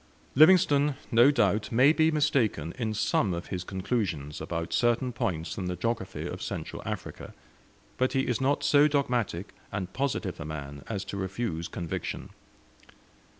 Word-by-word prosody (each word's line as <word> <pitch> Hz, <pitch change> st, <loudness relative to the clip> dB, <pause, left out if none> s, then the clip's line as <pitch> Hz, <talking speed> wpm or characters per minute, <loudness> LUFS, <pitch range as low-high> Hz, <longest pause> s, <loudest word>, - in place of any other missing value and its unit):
Livingstone 150 Hz, -3 st, +5 dB, 0.2 s
no 120 Hz, +3 st, +7 dB
doubt 110 Hz, -7 st, +1 dB
may 130 Hz, +6 st, +5 dB
be 160 Hz, 0 st, +3 dB
mistaken 135 Hz, -, +1 dB
in 110 Hz, -3 st, -1 dB
some 105 Hz, -3 st, +1 dB
of 85 Hz, -, -6 dB
his 90 Hz, -1 st, -3 dB
conclusions 95 Hz, -, -3 dB
about 85 Hz, 0 st, -4 dB
certain 120 Hz, +1 st, +2 dB
points 95 Hz, -8 st, -2 dB
in 95 Hz, -, -3 dB
the 90 Hz, 0 st, -2 dB
geography 115 Hz, -2 st, -3 dB
of -, -, -5 dB
Central -, -, -5 dB
Africa, -, -, -6 dB, 0.6 s
but 130 Hz, 0 st, +1 dB
he 135 Hz, -, +2 dB
is 125 Hz, -2 st, -1 dB
not 140 Hz, +2 st, +1 dB
so 145 Hz, +1 st, +5 dB
dogmatic 125 Hz, -, -1 dB, 0.2 s
and 95 Hz, -2 st, -4 dB
positive 135 Hz, 0 st, -2 dB
a -, -, -4 dB
man 70 Hz, -2 st, -7 dB
as 100 Hz, -3 st, -3 dB
to 100 Hz, 0 st, -5 dB
refuse 95 Hz, -3 st, -3 dB
conviction. 85 Hz, -3 st, -5 dB
110 Hz, 150 wpm, -28 LUFS, 90-135 Hz, 0.6 s, no